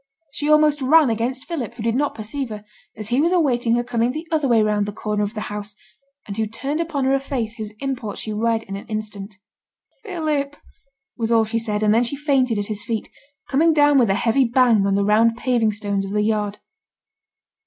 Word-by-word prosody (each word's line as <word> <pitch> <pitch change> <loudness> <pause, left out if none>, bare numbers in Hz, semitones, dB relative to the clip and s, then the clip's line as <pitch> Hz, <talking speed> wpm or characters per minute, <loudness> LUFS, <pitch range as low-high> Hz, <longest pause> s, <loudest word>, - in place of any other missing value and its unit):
She 295 - -2
almost 305 -1 +4
ran 285 0 +5
against 245 +4 -2
Philip, 255 -9 -4
who 230 - -7
did 230 0 +1
not 285 +4 0
perceive 235 +5 -5
her, 210 -1 -8 0.3
as 215 0 -6
he 250 +3 +2
was 335 +3 +2
awaiting 245 -9 +2
her 240 - 0
coming 240 0 0
the 315 +5 -6
other 305 -3 +1
way 230 -3 +4
round 210 -1 +1
the - - -3
corner 210 0 -2
of 205 +2 -2
the 215 - -3
house, 210 0 -6 0.5
and 200 - -6
who 220 0 -1
turned 275 +8 -3
upon 305 -5 -2
her 265 - +3
a 275 - +3
face 245 -5 -4
whose 215 -2 -6
import 260 -6 -4
she 215 - -5
read 225 +1 0
in 195 - -7
an 200 - -8
instant. 215 -2 -5 0.7
'Philip!' 305 -8 -2 0.6
was 230 -1 -1
all 225 -1 +4
she 225 +1 -1
said, 215 -2 -2
and 210 0 +4
then 230 +2 +4
she 245 +4 -2
fainted 270 -5 +1
at 205 - -1
his 210 -1 -5
feet, 230 -2 -3 0.4
coming 320 +4 +3
down 290 -2 +5
with 235 -5 +3
a 195 - +3
heavy 235 +4 +2
bang 235 -4 +3
on 195 - +1
the 200 0 +1
round 225 +2 +3
paving 240 -4 +1
stones 205 -1 -2
of 195 +1 -5
the 210 0 +1
yard. 210 -1 -1
230 Hz, 220 wpm, -21 LUFS, 215-275 Hz, 0.7 s, ran